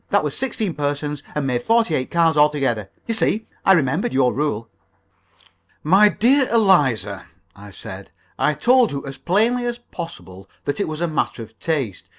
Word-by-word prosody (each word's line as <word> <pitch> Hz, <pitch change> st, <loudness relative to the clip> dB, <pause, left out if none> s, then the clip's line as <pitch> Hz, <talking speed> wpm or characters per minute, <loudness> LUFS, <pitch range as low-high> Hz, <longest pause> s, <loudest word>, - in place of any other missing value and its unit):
That -, -, +2 dB
was -, -, -3 dB
sixteen 225 Hz, -8 st, -2 dB
persons, 145 Hz, 0 st, -3 dB
and 150 Hz, -2 st, -1 dB
made 125 Hz, -2 st, 0 dB
forty 225 Hz, -, +2 dB
eight 130 Hz, -3 st, -1 dB
cards 165 Hz, -2 st, +2 dB
altogether. 140 Hz, -9 st, +1 dB, 0.2 s
You 230 Hz, -, -2 dB
see, 220 Hz, 0 st, 0 dB, 0.2 s
I 195 Hz, -, +6 dB
remembered 135 Hz, -7 st, +1 dB
your 130 Hz, -2 st, +2 dB
rule." 125 Hz, -6 st, -2 dB, 1.2 s
"My 195 Hz, +7 st, +5 dB
dear 260 Hz, +5 st, +2 dB
Eliza," 135 Hz, -, +2 dB, 0.3 s
I 100 Hz, +1 st, -12 dB
said, 95 Hz, -, -10 dB, 0.3 s
"I 150 Hz, -, +2 dB
told 245 Hz, -, +3 dB
you 140 Hz, 0 st, -5 dB
as 135 Hz, -1 st, -8 dB
plainly 225 Hz, -, +1 dB
as 240 Hz, 0 st, -3 dB
possible 165 Hz, -, -10 dB, 0.2 s
that 145 Hz, -, -2 dB
it 200 Hz, -, 0 dB
was 155 Hz, +1 st, -5 dB
a 175 Hz, -, +1 dB
matter 155 Hz, -6 st, -2 dB
of 110 Hz, 0 st, -16 dB
taste. 135 Hz, -, -3 dB
150 Hz, 170 wpm, -21 LUFS, 130-205 Hz, 1.2 s, I